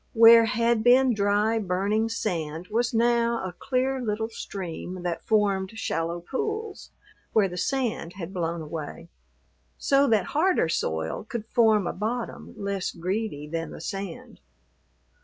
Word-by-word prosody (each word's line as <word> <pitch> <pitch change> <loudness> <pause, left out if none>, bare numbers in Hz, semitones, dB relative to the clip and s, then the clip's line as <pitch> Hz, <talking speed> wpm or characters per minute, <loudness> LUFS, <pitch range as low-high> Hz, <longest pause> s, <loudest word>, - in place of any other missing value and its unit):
Where 230 0 +8
had 230 +1 +1
been 250 +1 +5
dry, 210 +2 +2
burning 205 +3 0
sand 170 -6 -3
was 235 +3 +1
now 235 0 +2
a 185 - -5
clear 260 +4 -1
little 220 -1 -2
stream 185 -4 -6
that 175 -2 -3
formed 205 -1 +1
shallow 165 -4 -2
pools 430 - -4 0.4
where 210 -3 +4
the 180 - -7
sand 230 -5 -1
had 190 -1 -7
blown 170 -2 -2
away, 160 +2 -7 0.7
so 280 0 +3
that 215 -6 +3
harder 320 - +2
soil 80 - -2
could 235 -4 -4
form 220 -4 +3
a - - -2
bottom 225 +5 -4
less 200 -2 -2
greedy 180 -3 -3
than 165 +1 -3
the - - -9
sand. 195 -4 -6
210 Hz, 140 wpm, -26 LUFS, 180-235 Hz, 0.7 s, Where